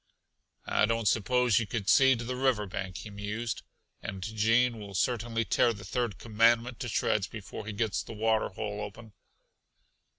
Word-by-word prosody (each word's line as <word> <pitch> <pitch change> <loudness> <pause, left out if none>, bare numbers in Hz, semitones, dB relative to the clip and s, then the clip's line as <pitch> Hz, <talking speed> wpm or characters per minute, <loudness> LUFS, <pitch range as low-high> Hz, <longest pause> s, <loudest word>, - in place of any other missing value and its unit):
"I 105 - +2
don't 115 -1 0
suppose 120 +2 +3
you 110 - -2
could 100 -1 -3
see 135 +3 +6
to 120 - -5
the 125 +2 -3
river 125 -5 +1
bank," 95 -2 -5
he 105 - -8
mused, 105 +4 -4 0.4
"and 95 -1 -6
Gene 115 +3 +2
will 100 -2 -8
certainly 115 +3 0
tear 115 +4 +3
the 105 - -10
third 120 -6 -2
commandment 115 +2 +2
to 120 - -4
shreds 105 -2 +1
before 105 0 -8
he - - -3
gets 110 -1 -1
the - - -9
water 110 0 +1
hole 105 +1 -5
open." 105 +1 -9
110 Hz, 170 wpm, -29 LUFS, 105-120 Hz, 0.4 s, see